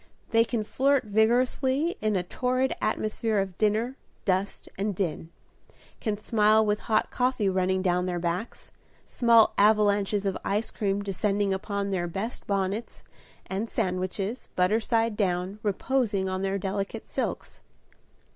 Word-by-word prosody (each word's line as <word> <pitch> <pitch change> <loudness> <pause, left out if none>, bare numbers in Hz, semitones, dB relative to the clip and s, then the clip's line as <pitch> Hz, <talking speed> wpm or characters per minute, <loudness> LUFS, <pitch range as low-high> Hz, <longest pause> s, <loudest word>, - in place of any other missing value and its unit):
They 230 0 +5
can 230 -1 -2
flirt 270 +4 +2
vigorously 255 - +2
in 215 -1 +1
a 180 - +1
torrid 255 +7 0
atmosphere 215 0 -1
of 195 -2 -1
dinner, 220 +5 +1 0.3
dust, 190 +1 -1
and 200 0 -2
din; 165 -3 -3 0.7
can 215 -3 -2
smile 215 0 +3
with 210 0 +1
hot 215 -1 +2
coffee 250 -4 +1
running 185 0 +1
down 180 -1 +1
their 175 -1 -1
backs, 175 +5 -4 0.3
small 230 -2 +4
avalanches 205 -1 +3
of 195 - -1
ice 210 +3 -1
cream 200 -2 -1
descending 200 0 0
upon 200 +1 -3
their 175 -2 -1
best 195 +7 -4
bonnets, 200 +3 -2 0.4
and 200 +4 -3
sandwiches, 190 +5 -2
butter 185 +5 +3
side 230 -1 +1
down, 185 0 -1
reposing 210 -1 0
on 185 0 -2
their 195 0 0
delicate 195 +1 -3
silks. - - -4
205 Hz, 135 wpm, -27 LUFS, 190-225 Hz, 0.7 s, They